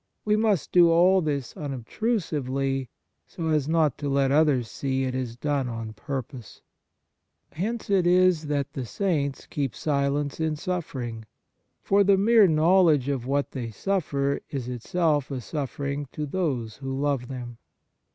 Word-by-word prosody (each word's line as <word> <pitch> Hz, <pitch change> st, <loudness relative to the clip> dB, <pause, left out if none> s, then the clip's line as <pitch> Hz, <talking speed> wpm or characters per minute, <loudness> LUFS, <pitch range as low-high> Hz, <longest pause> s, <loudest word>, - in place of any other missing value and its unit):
We 210 Hz, 0 st, +3 dB
must 215 Hz, -5 st, +1 dB
do 175 Hz, -2 st, +6 dB
all 180 Hz, +3 st, +5 dB
this 145 Hz, -5 st, -3 dB
unobtrusively, 135 Hz, -, -2 dB, 0.4 s
so 165 Hz, -1 st, -4 dB
as 150 Hz, -2 st, +1 dB
not 160 Hz, -3 st, +2 dB
to 145 Hz, -, -2 dB
let 135 Hz, -1 st, +2 dB
others 145 Hz, -5 st, +3 dB
see 135 Hz, +1 st, -2 dB
it 130 Hz, -1 st, -2 dB
is 125 Hz, -3 st, -3 dB
done 140 Hz, 0 st, -1 dB
on 115 Hz, -2 st, -5 dB
purpose. 130 Hz, +1 st, -7 dB, 0.9 s
Hence 220 Hz, +8 st, -3 dB
it 190 Hz, -3 st, +2 dB
is 180 Hz, -3 st, +4 dB
that 145 Hz, -2 st, -2 dB
the 130 Hz, -, -4 dB
saints 140 Hz, -, -1 dB
keep 140 Hz, -5 st, -3 dB
silence 140 Hz, 0 st, -1 dB
in 160 Hz, -1 st, 0 dB
suffering; 130 Hz, -10 st, -4 dB, 0.6 s
for 200 Hz, +1 st, +4 dB
the 195 Hz, 0 st, +4 dB
mere 215 Hz, +1 st, +6 dB
knowledge 160 Hz, -3 st, +4 dB
of 130 Hz, -3 st, -2 dB
what 140 Hz, +1 st, 0 dB
they 120 Hz, -4 st, -4 dB
suffer 140 Hz, -, -1 dB
is 135 Hz, -4 st, -4 dB
itself 145 Hz, +3 st, 0 dB
a 135 Hz, -2 st, -3 dB
suffering 140 Hz, +2 st, -4 dB
to 150 Hz, -, -3 dB
those 135 Hz, -9 st, -2 dB
who 135 Hz, -1 st, -4 dB
love 140 Hz, -4 st, 0 dB
them. 120 Hz, -2 st, -7 dB
145 Hz, 150 wpm, -26 LUFS, 130-170 Hz, 0.9 s, do